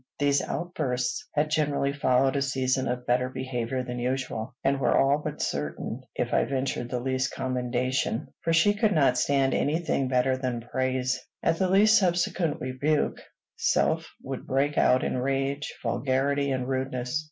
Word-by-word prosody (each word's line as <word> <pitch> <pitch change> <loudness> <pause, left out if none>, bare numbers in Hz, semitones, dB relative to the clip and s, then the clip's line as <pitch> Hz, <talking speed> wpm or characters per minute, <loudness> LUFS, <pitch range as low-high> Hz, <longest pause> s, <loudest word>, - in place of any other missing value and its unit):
These 145 -1 +2
outbursts 135 -8 -2
had 150 +1 +1
generally 145 -2 +1
followed 135 -1 +2
a 140 - +1
season 130 -1 0
of 125 0 -3
better 125 +1 +1
behavior 130 -1 -3
than 125 0 -5
usual, 125 -2 -3
and 135 0 +2
were - - +3
all 140 +2 +3
but 150 -1 -3
certain 70 0 -3
if - - -2
I - - +4
ventured 130 -1 -2
the 125 - -2
least 130 0 -1
commendation; 125 -1 -1 0.2
for 165 - 0
she 165 +5 +4
could 205 -3 +1 0.2
stand 135 +1 +2
any 150 +3 +1
thing 160 -5 -1
better 130 0 +2
than 125 -3 -2
praise. 130 +1 -1 0.2
At 165 0 +1
the 190 -1 +2
least 215 +4 +6
subsequent 175 -3 0
rebuke, 140 +4 0 0.4
self - - +1 0.2
would - - -6
break 140 +2 +1
out 125 - +4
in 125 - -1
rage, 135 +2 -1
vulgarity, 140 +1 0
and 130 -2 -1
rudeness. 130 +1 -2
130 Hz, 160 wpm, -27 LUFS, 125-145 Hz, 0.4 s, least